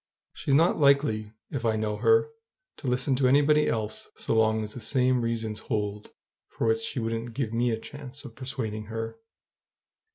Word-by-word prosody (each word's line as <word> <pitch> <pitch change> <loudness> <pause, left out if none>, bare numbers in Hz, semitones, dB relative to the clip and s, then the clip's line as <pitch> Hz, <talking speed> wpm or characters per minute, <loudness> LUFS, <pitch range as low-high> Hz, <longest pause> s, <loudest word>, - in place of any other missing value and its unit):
She's 135 - 0
not 165 +4 +4
likely, 140 -7 +3 0.2
if 135 -4 -3
I 110 -1 +2
know 110 -1 -1
her, 455 0 +4 0.5
to 140 - -7
listen 125 +2 +1
to 130 -1 +3
anybody 145 +3 +4
else 110 -1 -2
so - - -2
long 110 -1 +3
as 105 0 -7
the - - -7
same 125 +2 +2
reasons 115 -2 -2
hold 105 -1 -3 0.4
for - - -3
which 115 0 +3
she 125 - -3
wouldn't 115 0 -3
give 120 -5 -2
me 120 +1 +2
a 110 - 0
chance 145 +2 -10
of 120 - -9
persuading 120 -5 -4
her. 115 - -5
115 Hz, 175 wpm, -27 LUFS, 110-135 Hz, 0.5 s, not